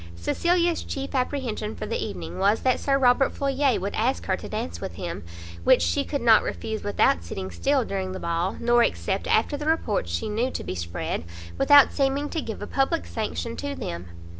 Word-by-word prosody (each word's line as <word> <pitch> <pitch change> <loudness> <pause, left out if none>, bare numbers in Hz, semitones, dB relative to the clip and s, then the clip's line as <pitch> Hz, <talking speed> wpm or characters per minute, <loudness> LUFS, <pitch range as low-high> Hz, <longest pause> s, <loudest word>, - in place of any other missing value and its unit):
Cecilia's 340 - +1
chief 275 0 -5
apprehension 250 -5 -2
for - - -5
the - - -2
evening 85 -3 -6
was 205 +3 +3
that 255 -1 +2
Sir 275 -1 +2
Robert 260 0 +4
Floyer 275 -2 +1
would 200 +2 -3
ask 85 -1 0
her - - +1
to - - -9
dance 85 0 -4
with 85 - -5
him, - - -5 0.4
which 85 - +5
she 85 0 +1
could 285 - -3
not 225 -2 +7
refuse 220 -1 -4
without 200 - +2
sitting 95 +2 -6
still 270 - +1
during 190 -2 -3
the 185 - -5
ball, 170 +2 -1
nor 240 0 +4
accept, - - 0
after 290 - +2
the 300 +1 -5
reports 215 - 0
she 85 - -2
knew 225 +4 0
to - - -5
be - - -4
spread, 85 -2 -3 0.3
without 285 - +7
seeming 280 +1 0
to 325 - -2
give 220 -5 -6
a - - -3
public 275 +8 0
sanction 230 +1 -4
to 285 0 -4
them. 85 - -5
225 Hz, 200 wpm, -25 LUFS, -, 0.4 s, not